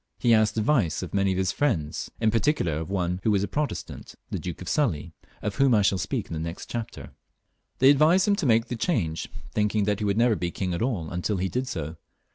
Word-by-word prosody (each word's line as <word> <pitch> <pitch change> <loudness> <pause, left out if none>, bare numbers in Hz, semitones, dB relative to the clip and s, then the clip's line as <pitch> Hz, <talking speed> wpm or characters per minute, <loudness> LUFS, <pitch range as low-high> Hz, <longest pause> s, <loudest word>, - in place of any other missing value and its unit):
He 120 -2 +3
asked 110 0 +3
advice 110 - +1
of - - -7
many 100 -1 +2
of 95 - -1
his 95 0 +1
chief - - -15
friends, 80 - 0
in 110 -1 +2
particular 110 - +1
of 80 - -5
one 90 -2 -1
who 110 - +1
was 100 -2 +2
a - - -1
Protestant, 150 0 -4 0.2
the - - -2
Duke 90 -2 -6
of 90 - -8
Sully, 90 - 0 0.3
of 105 -1 -3
whom 135 -3 +4
I 105 - +4
shall 95 -1 +2
speak - - -2
in - - -8
the 80 - -3
next 85 +2 -6
chapter. 120 0 -6 0.7
They 130 +2 +7
advised 160 +7 +4
him 205 - +4
to 145 - 0
make 115 -1 +4
the 120 - -4
change, 105 - -1 0.2
thinking 105 0 +1
that 105 0 0
he 105 - -1
would 100 0 +1
never 115 -1 +4
be 90 -3 -2
king 90 +1 -3
at 85 - -3
all 110 -10 -1
until 90 +4 -1
he 95 +1 -1
did 125 +8 -2
so. 80 -7 -5
105 Hz, 245 wpm, -26 LUFS, 90-120 Hz, 0.7 s, They